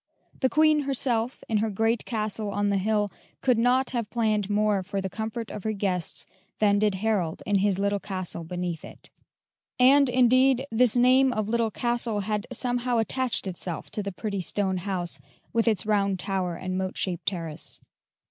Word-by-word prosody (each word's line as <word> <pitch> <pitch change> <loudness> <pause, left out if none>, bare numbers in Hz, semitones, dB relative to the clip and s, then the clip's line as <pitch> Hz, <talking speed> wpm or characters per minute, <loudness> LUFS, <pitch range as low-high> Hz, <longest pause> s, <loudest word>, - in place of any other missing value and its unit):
The 260 - +2
Queen 310 +3 +4
herself, 255 -4 0
in 220 - +1
her 220 +1 0
great 225 +3 0
castle 215 -2 -2
on 205 0 0
the 200 - +1
hill, 210 0 0 0.3
could 250 -3 +3
not 250 +3 +2
have 235 -4 -2
planned 215 -4 0
more 210 -1 +2
for 195 +2 -4
the 190 -1 -4
comfort 220 0 -4
of 205 - -7
her 220 - -1
guests 190 -4 -2 0.3
than 205 -1 +3
did 210 -2 +2
Harold 190 -5 -1
in 205 -1 +2
his 200 -1 +2
little 200 +1 0
castle 185 -4 -4
beneath 175 -1 -4
it; - - -13 0.7
and, 270 +2 +6
indeed, 255 +1 +4
this 240 +1 +3
name 255 +2 +5
of 215 -3 -2
Little 230 -1 +1
Castle 235 -1 -1
had 210 +2 -2
somehow 245 -1 0
attached 245 +2 +1
itself 180 -2 -4
to 210 - -2
the 200 0 -4
pretty 200 +1 -3
stone 190 +1 0
house, 180 -3 -1 0.3
with 230 0 +1
its 215 -3 +2
round 200 -2 +1
tower 185 -2 -2
and 185 +1 -3
moat 190 0 -3
shaped 180 -3 -3
terrace. 165 -5 -3
210 Hz, 175 wpm, -26 LUFS, 195-240 Hz, 0.7 s, and